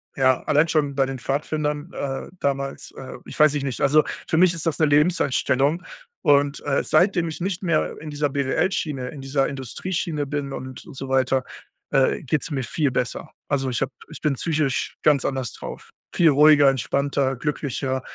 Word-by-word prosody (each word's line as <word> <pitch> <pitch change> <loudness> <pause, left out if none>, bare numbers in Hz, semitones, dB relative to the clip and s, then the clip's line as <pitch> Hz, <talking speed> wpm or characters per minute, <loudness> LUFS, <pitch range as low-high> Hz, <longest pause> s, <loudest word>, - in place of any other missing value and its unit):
äh, - - -6
ja, 130 -1 +3
allein 150 +2 +3
schon 145 -3 +1
bei 135 -1 +3
den 135 -1 -5
Pfadfindern, 150 +4 -2
äh, 135 -4 -4
damals, 140 -1 -2
äh 135 - -8
ich - - -9
weiß 150 -1 +6
ich 145 - -1
nicht. 135 -3 -3
Also, 150 +2 +5 0.3
für 160 - +2
mich 180 0 +5
ist 165 -1 -5
das 165 -3 -1
'ne 155 - +5
Lebenseinstellung. 145 0 +2 0.4
Und, 145 0 +3
äh, 140 -1 +1
seitdem 180 -3 +3
ich 160 +1 -6
nicht 190 +1 -2
mehr 165 -4 0
in 155 - -8
dieser 145 0 0
BWL-Schiene, 140 -1 -1
in 145 - -9
dieser 135 0 0
Industrieschiene 150 - -3
bin 140 -1 -4
und 130 -1 -8
und 155 - -12
so 135 0 -6
weiter, 130 0 +2 0.5
äh, 135 -2 +2
geht's 150 +3 -1
mir 135 -3 -1
viel 140 +3 0
besser. 125 -1 -3 0.2
Also, 135 -2 0
ich 120 - -2
habe 135 0 -1 0.2
ich - - -10
bin 150 -3 +1
psychisch 150 -3 -1
ganz 145 -3 +4
anders 130 -4 -2
drauf. - - -9 0.2
Viel 170 -2 +5
ruhiger, 145 0 +6
entspannter, 135 +1 0
glücklicher. 135 -1 -2
140 Hz, 185 wpm, -23 LUFS, 135-155 Hz, 0.5 s, weiß